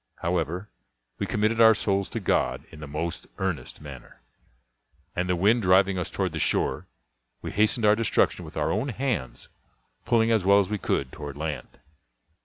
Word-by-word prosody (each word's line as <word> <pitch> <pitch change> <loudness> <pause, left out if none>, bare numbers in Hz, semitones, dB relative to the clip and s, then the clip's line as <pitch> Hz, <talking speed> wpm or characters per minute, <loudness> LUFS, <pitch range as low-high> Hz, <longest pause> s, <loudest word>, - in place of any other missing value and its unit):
However, 85 +2 -1 0.5
we - - -2
committed 110 +2 +1
our 110 -1 +8
souls 100 -2 0
to 115 - -4
God 100 - 0
in 80 - -12
the 75 - -8
most 80 +4 -4
earnest 85 -11 -3
manner; 70 -4 -11 1.0
and 90 +1 -1
the 90 - +2
wind 105 +7 +3
driving 95 0 +4
us 90 - -3
toward - - -2
the - - -4
shore, - - 0 0.6
we - - -4
hastened 110 +2 +2
our 105 0 +6
destruction 115 0 +1
with - - -10
our - - 0
own 115 +8 -1
hands, 110 - -3 0.6
pulling 115 -1 +2
as 110 -4 +2
well 100 +2 +5
as 100 -2 0
we 105 -1 -2
could 65 -7 -1
toward 70 -2 -8
land. 80 0 -5
95 Hz, 175 wpm, -26 LUFS, 80-110 Hz, 1.0 s, our